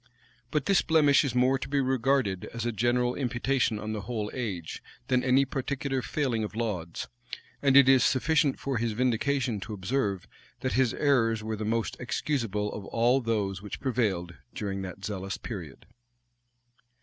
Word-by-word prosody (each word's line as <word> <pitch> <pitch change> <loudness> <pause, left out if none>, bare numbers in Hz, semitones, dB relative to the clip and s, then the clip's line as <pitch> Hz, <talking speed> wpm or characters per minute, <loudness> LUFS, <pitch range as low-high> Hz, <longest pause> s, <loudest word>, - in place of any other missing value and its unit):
But 150 -3 -1
this 195 -3 +4
blemish 150 -3 +4
is 130 -4 -2
more 130 +2 +3
to - - -6
be 140 0 +1
regarded 130 -6 +1
as 115 0 -5
a 120 - +1
general 120 +3 +1
imputation 125 -2 0
on 110 +1 -4
the 105 - -3
whole 110 -1 -3
age, 95 -11 -4 0.3
than 125 -1 +2
any 135 +1 +4
particular 135 0 -2
failing 125 -6 -1
of 105 - -5
Laud's; 95 -8 -3 0.5
and 140 -1 +5
it 140 -2 +8
is 130 -2 +6
sufficient 140 +1 +2
for 135 -4 -2
his 115 -1 -1
vindication 125 0 0
to 110 +2 -6
observe, 100 -2 -1 0.3
that 130 - -1
his 130 -2 +2
errors 115 -7 +2
were 110 0 -2
the 110 0 -4
most 115 +1 -1
excusable 115 -5 -2
of 105 - -6
all 120 +5 +2
those 105 -5 -1
which 105 - -7
prevailed 105 -10 -1 0.2
during 100 -2 -3
that 95 +1 -7
zealous 95 -1 -4
period. 85 - -8
120 Hz, 165 wpm, -28 LUFS, 105-135 Hz, 0.5 s, it